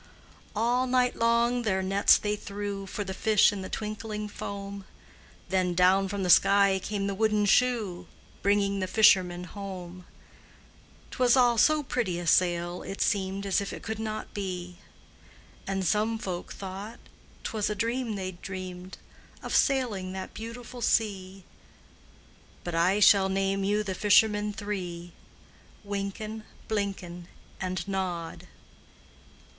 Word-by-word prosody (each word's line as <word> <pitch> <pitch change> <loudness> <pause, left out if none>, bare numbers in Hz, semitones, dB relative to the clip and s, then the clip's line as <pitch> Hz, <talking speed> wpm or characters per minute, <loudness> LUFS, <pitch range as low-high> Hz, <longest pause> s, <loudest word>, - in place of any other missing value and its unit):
All 240 +4 +1
night 250 0 +2
long 235 +1 +2
their 190 -4 0
nets 195 +2 +5
they 210 0 -1
threw 200 -1 -5
For 205 - -4
the 190 -1 -5
fish 215 +1 +4
in 200 - -5
the 185 - -6
twinkling 215 0 -4
foam, 200 -1 -6 0.7
Then 185 -1 +1
down 185 +2 +4
from 200 0 -3
the 180 - -1
sky 200 0 +5
came 200 0 -3
the 200 - -1
wooden 210 0 +1
shoe, 205 -6 +1 0.3
Bringing 200 0 +2
the 185 - -1
fishermen 185 -4 +4
home; 185 -2 -8 1.0
'T - - -9
was 250 0 +5
all 240 -2 +4
so 305 +3 +4
pretty 225 -10 -1
a 175 - -5
sail, 175 0 +2
it 195 - -7
seemed 195 -1 0
As 195 0 +1
if 200 - -4
it - - -8
could 220 -1 -4
not 215 -1 -5
be; 180 -3 -5 0.9
And 195 -1 -1
some 215 +3 +1
folk 185 -5 -5
thought 200 +4 -7 0.5
't - - -4
was 215 -2 0
a 210 - -2
dream 230 +1 -1
they'd 185 -2 -6
dreamed 185 -1 -7 0.5
Of - - -2
sailing 220 -9 +1
that 190 0 -6
beautiful 235 +2 -8
sea; 195 -5 0 1.2
But 175 - -5
I 180 +5 +3
shall 195 -2 +6
name 195 0 0
you 205 +2 +1
the 195 -2 -3
fishermen 210 +1 +3
three: 180 -5 -5 0.7
Wynken, 205 +2 -5 0.2
Blynken, 190 -5 -3 0.3
And 185 +1 -3
Nod. 180 -4 -4
200 Hz, 140 wpm, -28 LUFS, 185-215 Hz, 1.2 s, shall